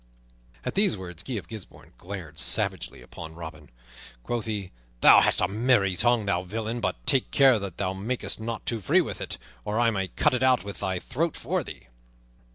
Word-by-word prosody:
At - - -2
these 195 - +3
words 90 -3 -6
Guy 130 - -5
of 100 -8 -4
Gisbourne 110 -3 -10
glared 85 -5 -7
savagely - - +1
upon 80 -1 -9
Robin. 80 -4 -9 0.5
Quoth 120 - -2
he, 100 -4 -3 0.3
"Thou - - +9
hast - - +3
a 90 - +3
merry 105 -2 +2
tongue, 120 +1 +2
thou 100 -3 +1
villain; 110 +5 -3
but - - -2
take 135 - +2
care 135 -5 +5
that 100 -4 -6
thou 95 -1 -1
makest 110 +7 -3
not 115 +1 -4
too 115 -2 -2
free - - +4
with - - -5
it, - - -4 0.3
or 105 +2 -1
I 120 -1 +4
may 95 -3 -1
cut 150 +9 +1
it 125 - 0
out 130 -1 +4
from 100 - -6
thy 95 -1 -2
throat 150 - -2
for - - -1
thee." - - -9
105 Hz, 195 wpm, -27 LUFS, 90-120 Hz, 0.5 s, Thou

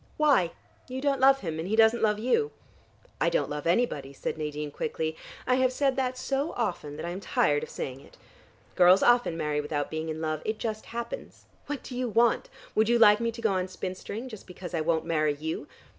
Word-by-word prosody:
"Why? 275 - +3 0.3
You 260 0 -4
don't 275 -1 +1
love 270 0 +6
him. 160 -3 -4
And 165 - -3
he 215 - +1
doesn't 225 +1 +5
love 210 -1 +3
you." 255 - +1 0.7
"I - - +4
don't - - 0
love 150 +2 -3
anybody," 165 - +1
said - - -3
Nadine 150 -1 -4
quickly. 160 +2 -3 0.3
"I 255 0 +3
have 260 -1 +3
said 270 0 +1
that 255 -1 -1
so 275 +4 -1
often 175 -10 -3
that 155 - -5
I 170 - -3
am 180 - -5
tired 145 -6 +1
of - - -6
saying 130 0 -5
it. - - -18 0.6
Girls 180 +2 +6
often 240 -9 +4
marry 150 -2 0
without 145 0 -3
being 160 0 -3
in 155 0 -4
love. 155 -1 -2
It 215 0 -2
just 220 -1 -4
happens. 235 - -6 0.2
What 290 -2 -4
do 250 - -7
you 250 -1 -1
want? 230 +1 +2 0.2
Would 220 +1 +3
you 240 - +5
like 210 -2 +7
me 230 0 0
to 230 +1 -9
go 220 - +3
on 185 0 0
spinstering 190 +6 -6
just 215 -5 -10
because 180 -1 -8
I 165 - 0
won't 160 0 +1
marry 155 -2 +1
you? 160 +2 -4
205 Hz, 220 wpm, -28 LUFS, 160-245 Hz, 0.7 s, like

